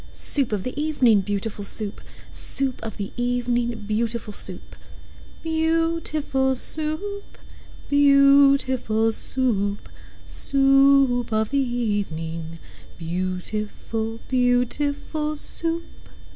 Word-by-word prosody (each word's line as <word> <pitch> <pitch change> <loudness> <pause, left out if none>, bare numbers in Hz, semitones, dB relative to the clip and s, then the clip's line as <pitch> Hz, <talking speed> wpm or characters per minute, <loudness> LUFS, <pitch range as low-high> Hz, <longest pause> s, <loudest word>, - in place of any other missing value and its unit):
Soup 275 -6 +4
of 205 -3 -2
the 255 - -4
evening, 255 -9 +3
beautiful 205 +1 -4
Soup! 205 0 -2 0.3
Soup 270 -2 0
of 225 -3 -6
the 200 -1 -5
evening, 240 -2 -1
beautiful 225 +1 -2
Soup! 185 -2 -4 0.7
Beau 325 +1 0
ootiful 270 -4 -1
Soo 305 +4 0
oop! 405 +1 -8 0.5
Beau 280 -1 +6
ootiful 225 -4 -1
Soo 260 - +1 0.3
oop! 205 - -14 0.4
Soo 280 - +1 0.5
oop 245 -1 -2
of 220 +1 0
the 280 - +1
e - - +3
e 230 -4 0
evening, 165 -2 -6 0.4
Beautiful, 205 +6 -4
beautiful 285 +5 0
Soup! 330 +2 -2
245 Hz, 110 wpm, -23 LUFS, 215-280 Hz, 0.7 s, Beau